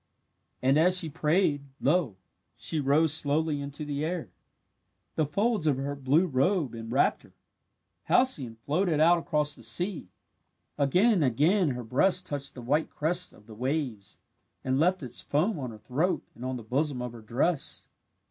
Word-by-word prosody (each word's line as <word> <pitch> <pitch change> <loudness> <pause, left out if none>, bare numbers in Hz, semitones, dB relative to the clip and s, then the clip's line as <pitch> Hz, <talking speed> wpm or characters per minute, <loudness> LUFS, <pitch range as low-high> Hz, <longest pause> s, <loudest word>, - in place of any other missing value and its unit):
And 135 +3 +4
as 180 +3 +5
she 165 -3 0
prayed, 150 -1 +1 0.2
lo, 145 - +1 0.4
she 160 - -1
rose 145 +2 +3
slowly 150 0 +1
into 140 +2 -6
the 145 0 -3
air. 170 0 -3 0.8
The 155 -2 0
folds 205 +1 0
of 140 -4 +2
her 140 +1 -3
blue 140 +5 +2
robe 150 - +1
enwrapped 115 +3 0
her. - - -20 0.7
Halcyone 140 - +2
floated 155 - 0
out 170 +2 +5
across 150 -3 0
the - - -12
sea. 155 - -1 0.7
Again 180 - +3
and 180 -7 +2
again 155 - +3
her 125 - -5
breast 180 +11 +2
touched 140 -4 -5
the 125 - -8
white 145 +6 +1
crest 175 +4 -1
of 105 - -19
the 110 - -12
waves 125 - -3 0.5
and 130 +1 0
left 180 +1 +2
its 125 - -5
foam 165 +6 0
on 130 -3 -4
her 110 - -10
throat 140 - -1
and 120 - -11
on 130 0 -3
the 120 - -9
bosom 135 +4 -1
of 125 - -4
her 115 -1 -11
dress. 135 +8 -1
145 Hz, 165 wpm, -28 LUFS, 130-170 Hz, 0.8 s, as